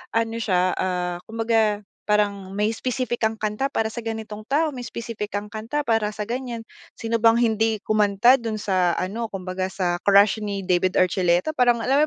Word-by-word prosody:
ano 225 0 0
siya, 185 -4 +2
ah, 180 -1 -1
kumbaga 225 -2 +1 0.2
parang 205 -2 +1
may 210 +1 +2
specific 250 0 -2
kang 220 0 +1
kanta 215 +6 -1
para 225 - 0
sa 230 +1 -6
ganitong 220 -1 -5
tao, 300 +2 +1
may 250 - -6
specific 230 -3 -6
kang 205 +1 -3
kanta 220 +7 -4
para 225 -3 +1
sa 210 -1 -5
ganyan. 245 0 -4 0.4
Sino 230 0 -2
bang 230 0 +6
hindi 220 -2 +1
kumanta 215 +3 +4
dun 230 -4 -3
sa 185 -4 +1
ano, 220 +5 -3
kumbaga 185 0 -4
sa 180 -3 -1
Crush 200 +2 +5
ni 200 -1 -3
David 180 0 +2
Archuleta. 180 - +2
Parang 245 -3 +3
alam 270 +6 +3
215 Hz, 175 wpm, -23 LUFS, 195-230 Hz, 0.4 s, bang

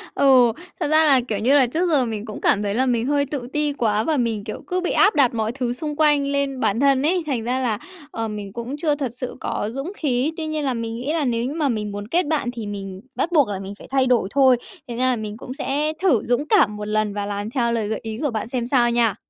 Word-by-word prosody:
Ừ, 255 -4 +5 0.3
thật - - 0
ra 310 +1 +4
là, 275 -4 +5
kiểu 210 -4 -2
như 255 +7 +3
là, 270 -3 +5
trước 335 +8 0
giờ 285 -6 +3
mình 220 -2 -4
cũng 215 - -8
cảm 205 - +2
thấy 200 0 -1
là 260 +3 +2
mình 240 -1 0
hơi 285 0 +2
tự 275 -3 -5
ti 300 -1 0
quá 220 -5 +1
và 315 +2 0
mình, 230 -5 -1
kiểu, - - -6
cứ 365 -1 -1
bị 360 - -1
áp 420 - +4
đặt 270 -5 +4
mọi 220 -1 -1
thứ 245 -1 -2
xung 300 +4 -4
quanh 295 -2 +3
lên 280 -1 -1
bản 220 -2 +1
thân 275 -1 +4
ấy, 350 +3 +2
thành 260 -7 -2
ra 250 +3 -1
là, 235 -5 0 0.3
ờ, 225 0 -3
mình 205 -2 -6
cũng 240 +5 -5
chưa 300 -1 +1
thật 275 -5 -3
sự 255 0 -5
có 210 - -2
dũng 275 +7 -4
khí. 275 +1 0
Tuy 320 - -3
nhiên 310 -1 -2
là 265 - +1
mình 230 -1 -4
nghĩ 255 +6 -3
là 320 -3 0
nếu 235 -2 0
như 270 - -3
mà 305 -3 0
mình 210 -3 -2
muốn 205 0 -6
kết 345 +8 +1
bạn 295 -5 0
thì 230 -4 -6
mình 195 -2 -6
bắt 345 - -1
buộc 295 -7 +4
là 195 -2 -3
mình 195 +1 -7
phải - - -12
thay 265 -1 +2
đổi 240 -6 +2
thôi. 265 -3 +5 0.3
Thành 235 -1 -6
ra 255 +1 +2
là 255 - +2
mình 215 -2 -6
cũng 255 +1 -7
sẽ 295 +2 -1
thử 285 - +4
dũng 245 +4 +1
cảm 290 - +4
một 210 0 -5
lần 215 -1 0
và 205 0 -3
làm 205 +1 -4
theo 235 -1 0
lời 225 -3 -1
gợi 220 0 -2
ý 220 -1 -5
của 290 - +1
bạn 220 0 -3
xem 240 -1 -2
sao 240 -2 +3
nha. 235 -4 +2
250 Hz, 285 wpm, -22 LUFS, 220-290 Hz, 0.3 s, Ừ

